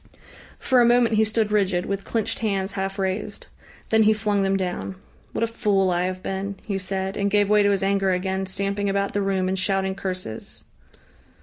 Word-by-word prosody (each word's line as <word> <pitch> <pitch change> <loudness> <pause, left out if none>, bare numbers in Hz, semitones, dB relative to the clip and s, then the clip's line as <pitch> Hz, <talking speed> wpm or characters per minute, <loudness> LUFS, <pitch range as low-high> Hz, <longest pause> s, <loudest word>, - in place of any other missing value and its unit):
For 255 -2 +3
a - - +5
moment 240 -1 +4
he 220 0 +4
stood 220 -1 0
rigid, 190 -4 +1
with 200 0 -3
clenched 225 -3 -1
hands 195 -3 -1
half 195 0 -3
raised. 195 +2 -3 0.4
Then 220 0 +4
he 215 0 +5
flung 210 -1 0
them 195 0 +2
down. 190 0 -3 0.4
"What - - -2
a - - +5
fool 200 -4 +1
I 175 +1 +1
have 185 0 -4
been!" 195 +1 -3
he 200 -2 -2
said, 190 +1 -3
and 200 0 0
gave 205 0 +2
way 210 0 +6
to 205 - +3
his 195 -1 +1
anger 195 0 +2
again, 190 +1 -1
stamping 200 +1 -1
about 200 0 0
the 205 - 0
room 190 -1 0
and 190 0 -1
shouting 190 0 0
curses.... 185 - -6
195 Hz, 200 wpm, -24 LUFS, 190-210 Hz, 0.4 s, way